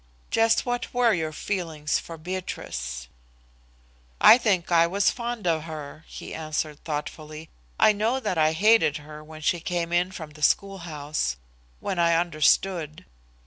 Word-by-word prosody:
Just 225 0 +3
what 245 0 -3
were 240 -2 +4
your 160 -3 -1
feelings 160 -3 -2
for 165 - -9
Beatrice?" 65 - -5 1.1
"I 235 - +8
think 190 -7 0
I 170 0 +5
was 200 +3 +2
fond 240 -3 -5
of 160 -2 +1
her," 155 -1 -8
he - - -9
answered 155 -1 -4
thoughtfully. 155 0 -6 0.3
"I - - +7
know 225 +5 0
that 215 - -2
I 155 -1 +3
hated 210 -3 +4
her 150 0 -11
when 155 0 -11
she 170 +3 +1
came 170 0 -3
in 175 +2 +2
from 160 -5 -8
the 150 0 -15
schoolhouse 155 - 0 0.5
when 185 - -2
I 170 -1 +4
understood. 165 0 +1
165 Hz, 145 wpm, -25 LUFS, 155-195 Hz, 1.1 s, I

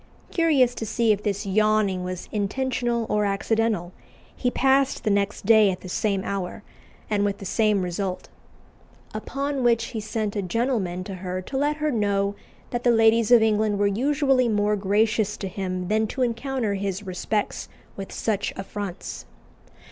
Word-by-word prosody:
Curious 290 -8 +3
to 225 - -5
see 230 +1 +2
if 205 -1 +1
this 205 0 -2
yawning 205 -2 +2
was 180 -1 -5
intentional 235 +2 -1
or 210 0 +1
accidental, 205 -2 0 0.4
he 250 - 0
passed 270 +1 +2
the 215 - +1
next 200 0 0
day 220 -1 +6
at 185 -1 -3
the 185 - -8
same 195 0 0
hour, 195 +1 -4 0.4
and 205 -2 +1
with 200 -1 0
the 195 - -9
same 210 -1 +2
result. 180 +1 -3 0.9
Upon 275 +5 -3
which 235 -2 +3
he 225 - -2
sent 215 0 -3
a 205 - 0
gentleman 195 -3 -1
to 195 - -7
her 185 0 -4
to 265 - -8
let 290 +2 +1
her 305 0 -1
know 200 -3 +1 0.4
that 240 0 -2
the 245 - +4
ladies 225 -1 +4
of 235 -2 +8
England 215 -1 +2
were 205 - +2
usually 265 +4 +2
more 210 -1 +2
gracious 210 +1 +1
to 195 - -4
him 185 -1 -4
than 215 +2 +1
to 260 +4 -2
encounter 240 -2 -1
his 195 0 -3
respects 195 +3 -2 0.3
with 195 -1 -7
such 205 -3 -1
affronts. 195 -1 -6
210 Hz, 165 wpm, -24 LUFS, 195-235 Hz, 0.9 s, of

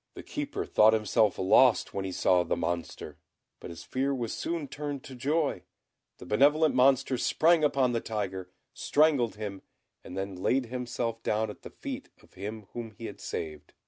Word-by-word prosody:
The - - -8
Keeper - - -4
thought 110 +1 +5
himself 110 -1 +2
lost 115 +6 +4
when 100 -1 -3
he 95 - -3
saw 90 0 +3
the 85 - -1
Monster; 85 -1 -4 0.4
but - - -9
his 85 -1 -9
fear 135 +6 -1
was 120 -3 -3
soon 165 -3 -3
turned 145 +1 -5
into 135 - -11
joy 140 - 0 0.6
the - - -11
benevolent 145 - +4
Monster 130 0 +3
sprang 165 0 +3
upon 135 -4 +3
the 115 -1 -1
tiger, 95 -4 -4 0.2
strangled 145 -7 +2
him, 105 -2 -6 0.4
and 90 - -8
then 95 0 -3
laid 130 +5 +2
himself 120 -1 -3
down 110 -1 0
at - - -14
the - - -9
feet - - -7
of - - -22
him 105 +2 -7
whom 115 -3 -7
he 115 - -7
had - - -8
saved. 75 -2 -6
115 Hz, 175 wpm, -29 LUFS, 100-135 Hz, 0.6 s, thought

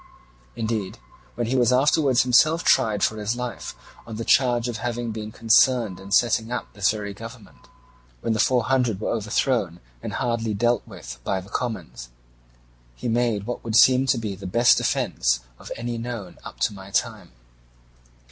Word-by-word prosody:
Indeed, 110 -4 -3 0.4
when 120 - -2
he 125 +4 -1
was 120 -2 +3
afterwards 135 0 +3
himself 155 +7 +4
tried 105 -3 +3
for 110 - +1
his 105 +2 -2
life 125 -1 -6 0.3
on 115 - -7
the 115 +1 -5
charge 120 -2 +3
of 120 -3 -4
having 120 +1 -3
been 110 0 -6
concerned 115 -3 +3
in 95 +1 -11
setting 115 +1 +2
up 125 - -4
this 100 -1 +1
very 105 -2 -3
government, 115 0 -12 0.5
when 115 - 0
the 110 - -2
Four 125 +1 +3
Hundred 125 -5 +1
were - - -2
overthrown 110 -4 -1 0.2
and - - -6
hardly 115 -3 -1
dealt 120 +2 +1
with 60 +1 -10
by 95 +6 -1
the 95 +1 -12
commons, 60 - -5 0.9
he 120 - -5
made 115 -3 0
what 120 +1 -5
would 115 -2 -3
seem 130 +3 +6
to 125 - +3
be 110 -3 -3
the 95 0 -8
best 120 +6 +4
defence - - 0 0.2
of - - -11
any 120 0 -4
known 115 -6 -7
up - - -10
to 105 - +1
my 95 -1 -11
time. 100 - -2
115 Hz, 175 wpm, -24 LUFS, 105-120 Hz, 0.9 s, seem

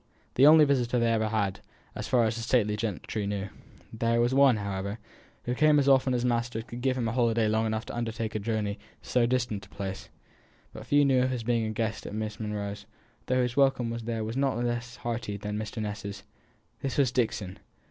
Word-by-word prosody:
The 135 +3 +6
only 155 0 +8
visitor 125 -3 +1
they 115 -1 +2
ever 110 -1 +1
had, 100 -3 -1 0.3
as - - -5
far 125 -2 +3
as 110 0 0
the 115 - -4
stately 115 -3 +2
gentry 105 0 -3
knew. 100 0 -3 0.4
There 115 +1 +1
was 120 +2 +2
one, 135 -3 +5
however, 100 0 -3 0.5
who 125 - -1
came 150 +3 +4
as 140 -1 +2
often 130 -1 +4
as 120 - -1
his - - +2
master 120 -1 -1
could 120 +1 -8
give 130 0 +1
him 120 -2 -1
a - - -1
holiday 115 -2 +2
long 110 +1 +1
enough 110 +1 -2
to - - -7
undertake 115 -1 -3
a 110 - -1
journey 105 -1 -2 0.2
to - - -15
so 125 -2 +3
distant 120 -5 -1
a - - -29
place; 95 -1 -6 0.6
but - - -10
few 145 0 +4
knew 130 -2 +4
of 130 - +2
his 125 -3 -3
being 115 -1 +1
a - - -2
guest 110 0 -3
at - - -6
Miss 110 +1 -4
Monro's, 105 -2 -4 0.4
though 130 0 +2
his 125 0 -2
welcome 135 -4 +2
there 115 -1 -3
was 110 +2 -4
not 135 -3 +1
less 120 0 -2
hearty 115 -3 -4
than 105 +1 -5
Mr. 110 +1 -4
Ness's 105 -1 -5 0.6
this 135 - -3
was 135 -4 +3
Dixon. 110 -6 -1
115 Hz, 220 wpm, -28 LUFS, 105-125 Hz, 0.6 s, only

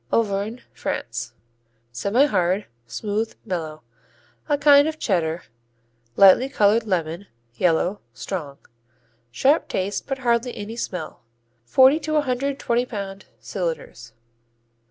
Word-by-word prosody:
Auvergne, 215 +2 0
France 115 0 -4 0.6
Semihard; 200 - +1 0.2
smooth; 215 - -3
mellow; 160 -6 -4 0.7
a 290 - +3
kind 285 0 +6
of 315 0 -3
Cheddar, 170 - -1 0.7
lightly 200 +7 +7
colored 220 -2 +3
lemon; 175 0 -2 0.3
yellow; 180 - +1
strong, 140 +4 -6 0.7
sharp 270 - +2
taste 195 +2 -2
but 270 - -2
hardly 240 -1 0
any 210 +2 -6
smell. 185 -6 -5 0.4
Forty 265 - +5
to 310 -1 -2
a 300 - +4
hundred 275 0 -1
twenty 240 0 0
pound 200 -3 -6
cylinders. 160 - -5
205 Hz, 110 wpm, -23 LUFS, 170-250 Hz, 0.7 s, lightly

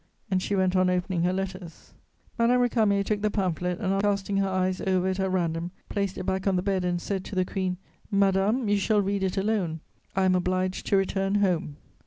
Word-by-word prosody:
And 185 -1 +2
she 200 - -1
went 190 -1 +2
on 185 0 +3
opening 180 -1 0
her 180 +1 +2
letters. 185 -2 -6 0.5
Madame 240 +2 +4
Récamier 215 -5 +2
took 210 0 -1
the 210 - +2
pamphlet 180 -3 -1
and, 195 -3 0
after 195 +1 +1
casting 200 0 0
her 195 0 +1
eyes 185 0 0
over 185 -1 +1
it 190 +1 -2
at 190 0 +1
random, 170 -2 -1 0.2
placed 200 -2 -2
it 185 - -4
back 190 +1 -1
on 195 - +3
the 180 - 0
bed 190 -2 0
and 175 -1 0
said 190 +1 -3
to 205 - -7
the 185 0 +2
Queen: 185 -1 -2 0.3
"Madame, 200 +4 +2
you 205 0 +3
shall 205 +1 +2
read 200 0 -1
it 190 0 -1
alone, 195 -5 0 0.4
I 190 - +2
am 185 - +4
obliged 185 +1 -1
to 200 - +3
return 195 +1 0
home." 180 -7 0
190 Hz, 220 wpm, -26 LUFS, 185-200 Hz, 0.5 s, Madame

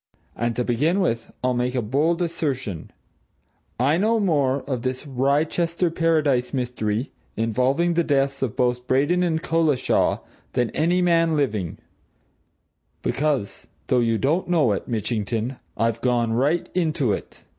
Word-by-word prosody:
And 120 0 -1
to 125 - 0
begin 150 - +1
with, 115 -11 -1
I'll 130 0 +2
make 125 +1 -1
a 125 - +1
bold 155 +10 +1
assertion 135 - -3 0.9
I 140 +6 +3
know 220 +4 +2
more 140 -8 +1
of 130 -4 -3
this 130 +3 -3
Wrychester 155 +6 0
Paradise 155 -6 +1
mystery 120 -1 -2 0.3
involving 130 +10 +1
the 170 0 +2
deaths 140 -2 0
of 130 -5 -1
both 125 0 0
Braden 145 +7 +2
and 165 -2 0
Collishaw, 160 -5 +1 0.3
than 120 -2 0
any 175 +3 +1
man 165 -2 +3
living 110 - -1 1.3
because, 140 -7 -1 0.2
though 125 - +4
you 115 -1 +2
don't 155 +10 0
know 160 -10 +3
it, 100 - -2
Mitchington, 115 +2 -2 0.2
I've 115 +1 0
gone 120 -2 +1
right 145 +8 +1
into 155 - +1
it. - - -7
135 Hz, 140 wpm, -23 LUFS, 120-165 Hz, 1.3 s, though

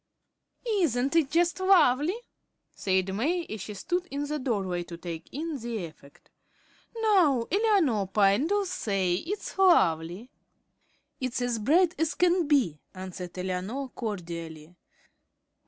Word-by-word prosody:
"Isn't 315 - +1
it 315 -5 +3
just 340 +3 +1
lovely?" 360 - +4 0.5
said 190 0 0
May, 325 - 0
as 215 -2 -7
she 210 - -7
stood 355 - -2
in 285 +1 -3
the 300 +1 -3
doorway 195 -9 -1
to 170 -1 -8
take 165 -1 -7
in 310 0 -4
the 230 -5 -4
effect. 150 -3 -16 0.7
"Now, 330 - +4
Eleanor 375 - +2
Pyne, 200 - +3
do 405 +2 +1
say 195 - -1
it's 350 - -4
lovely." 185 - +3 0.9
"It's 255 -1 -2
as 245 -2 -1
bright 335 - +3
as 320 0 0
can 355 -2 +2
be," 245 - +2 0.2
answered 185 -1 -7
Eleanor, 190 +9 -3
cordially. 170 -7 -6
245 Hz, 125 wpm, -27 LUFS, -, 0.9 s, lovely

